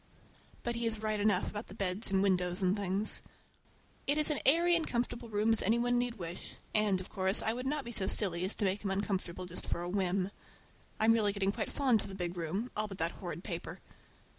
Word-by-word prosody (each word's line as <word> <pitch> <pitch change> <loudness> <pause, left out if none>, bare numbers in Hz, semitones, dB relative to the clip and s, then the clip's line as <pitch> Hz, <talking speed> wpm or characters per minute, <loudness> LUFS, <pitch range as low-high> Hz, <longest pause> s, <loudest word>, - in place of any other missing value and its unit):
But 240 - -1
he 235 0 -1
is 220 -1 -2
right 215 -1 0
enough 210 0 +2
about 210 +2 -5
the 195 - -11
beds 195 +1 +1
and 195 0 +2
windows 180 -1 +1
and 185 +1 +3
things. 200 +1 -1 0.9
It 285 +2 +3
is 305 0 +5
as 295 - +1
airy 340 +5 +5
and 330 -2 0
comfortable 240 0 -2
a - - -14
room 215 +2 +3
as 225 - +3
any 225 +4 +2
one 245 0 +2
need 245 -1 -1
wish, 175 -3 -6 0.2
and, 210 -3 +3
of 185 - -7
course, 190 0 +2
I 220 - +1
would 250 +2 -4
not 295 0 -1
be 235 - -5
so 200 -4 +4
silly 180 -4 +1
as 190 - 0
to 210 - 0
make 195 +2 0
him 200 - -1
uncomfortable 190 -2 -2
just 180 0 -5
for 170 - -2
a 175 - -3
whim. 190 0 0 0.7
I'm 225 +1 +5
really 210 -3 +2
getting 200 -1 +1
quite - - -3
fond 255 -7 +3
of - - -6
the 195 - -7
big 175 -1 -3
room, 180 +8 -3
all 215 0 0
but 195 -2 -8
that 165 -1 0
horrid 175 -1 -7
paper. 175 -5 -5
205 Hz, 240 wpm, -33 LUFS, 185-230 Hz, 0.9 s, is